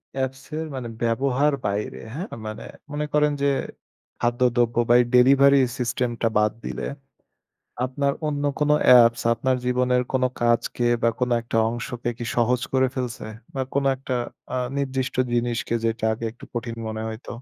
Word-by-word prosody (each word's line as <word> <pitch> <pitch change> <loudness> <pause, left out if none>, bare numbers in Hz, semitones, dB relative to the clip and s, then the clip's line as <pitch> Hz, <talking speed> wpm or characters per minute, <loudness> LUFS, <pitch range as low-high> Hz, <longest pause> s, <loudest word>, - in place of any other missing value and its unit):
Apps 135 0 -3
এর 160 - -2
মানে 125 -2 -4 0.2
ব্যবহার 135 +5 +2
বাইরে 100 +1 -2
হ্যাঁ? 170 +8 -4 0.2
মানে, 110 0 -6 0.3
মনে 150 0 -2
করেন 150 0 +3
যে 140 - +3 0.7
খাদ্যদ্রব্য 120 0 +1
বা - - +7
এই - - 0
ডেলিভারির 135 +1 +6
সিস্টেম 125 0 -1
টা 115 - +3
বাদ 105 0 +3
দিলে - - -4 1.0
আপনার 140 +2 0
অন্য 145 -1 -2 0.2
কোন 150 0 +1 0.2
অ্যাপস 120 -2 +7
আপনার 130 +3 0
জীবনের 125 0 +2
কোন 130 -1 +2 0.2
কাজকে 120 +1 +1 0.2
বা 115 - +5
কোন 125 -1 +1
একটা 115 0 -2
অংশকে 120 +1 -4
কি 120 - -5
সহজ 120 +1 +2
করে 130 0 +4
ফেলছে? 125 -4 -4 0.3
বা 135 - 0
কোনো 140 0 +1
একটা 130 0 -5 0.4
আ - - 0 0.2
নির্দিষ্ট 135 -1 -2 0.2
জিনিসকে 120 -1 -1
যেটা 115 -1 -1
আগে 115 +1 -5
একটু 120 - -13
কঠিন 120 -1 -4
মনে 110 0 -4
হইত? 110 +2 -9
125 Hz, 160 wpm, -24 LUFS, 115-135 Hz, 1.0 s, বা